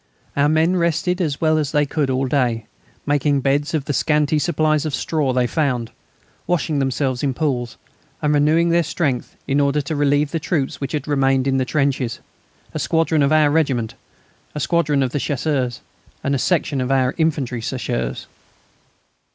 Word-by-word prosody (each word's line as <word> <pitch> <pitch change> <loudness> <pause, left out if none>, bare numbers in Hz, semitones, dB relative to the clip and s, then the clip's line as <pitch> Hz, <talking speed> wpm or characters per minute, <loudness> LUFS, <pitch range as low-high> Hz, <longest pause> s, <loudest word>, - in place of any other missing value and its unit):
Our 145 +1 +3
men 160 +4 +2
rested 175 +2 0
as 150 -5 -1
well 155 -1 +2
as 145 -3 -2
they 150 -1 +2
could 145 -1 -1
all 130 +1 0
day, 125 -4 0 0.4
making 145 -1 +1
beds 145 +3 0
of 145 -3 -2
the 145 - -2
scanty 150 +1 +2
supplies 155 -2 +1
of 155 -4 -2
straw 150 -5 0
they 125 -1 +1
found, 125 -4 -1 0.6
washing 160 -4 0
themselves 135 -1 -1
in 135 -3 -1
pools, 125 -6 -2 0.4
and 150 0 +1
renewing 155 +4 +3
their 170 +1 +4
strength 145 -6 -2
in 140 +1 +1
order 140 +1 +2
to 145 +3 -4
relieve 145 0 +2
the 165 - -1
troops 145 -3 -2
which 135 +1 -4
had 150 -1 -3
remained 135 -2 +2
in 135 0 +2
the 130 - +1
trenches; 135 -3 0 0.5
a - - -3
squadron 160 -1 +1
of 140 +1 +3
our 155 -2 +4
regiment, 135 -8 0 0.6
a - - -2
squadron 150 -3 +1
of 130 - -1
the 145 - -1
Chasseurs, 135 -4 -1 0.4
and 140 - 0
a 140 - +1
section 150 -3 0
of 125 - -2 0.3
infantry 140 -7 0
Chasseurs. 65 - -3
145 Hz, 175 wpm, -20 LUFS, 135-155 Hz, 0.6 s, their